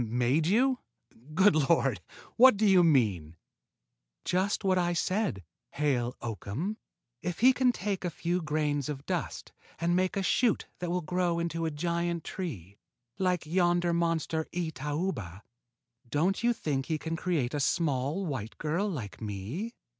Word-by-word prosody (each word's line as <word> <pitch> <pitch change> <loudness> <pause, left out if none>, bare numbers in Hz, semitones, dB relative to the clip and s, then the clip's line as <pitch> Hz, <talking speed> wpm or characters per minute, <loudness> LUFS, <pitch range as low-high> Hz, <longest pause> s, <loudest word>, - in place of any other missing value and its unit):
"Made 125 +7 +1
you? 250 +6 +3 0.6
Good 190 -1 +5
Lord! 135 - +2 0.3
What 255 -2 +7
do 215 - +2
you 190 -3 +6
mean?" 105 - +2 0.9
"Just 190 +4 0
what 185 -1 +3
I 175 -1 +1
said, 185 - -1 0.3
Hale 130 -4 0
Oakham. 120 - -4 0.4
If 180 +2 -4
he 260 +2 +7
can 255 -1 +3
take 195 -3 -3
a 175 - 0
few 175 +2 -2
grains 150 -2 -1
of 140 -2 -5
dust - - -3 0.3
and 170 +1 +1
make 185 +1 +1
a 195 - 0
shoot 230 +3 +2
that 175 - -3
will 180 0 -1
grow 175 +1 0
into 165 -1 -1
a - - 0
giant 170 +2 -2
tree 105 - -6 0.4
like 180 -3 +1
yonder 175 +1 +2
monster 165 -1 0
itauba, 150 - -3 0.7
don't 170 - +1
you 240 - +4
think 145 - -2
he 160 - 0
can 160 +2 -4
create 160 -7 -1
a 145 - -1
small 145 +3 0
white 125 - -4
girl 170 +7 -1
like 120 - -6
me?" 110 - -5
165 Hz, 150 wpm, -29 LUFS, 140-185 Hz, 0.9 s, What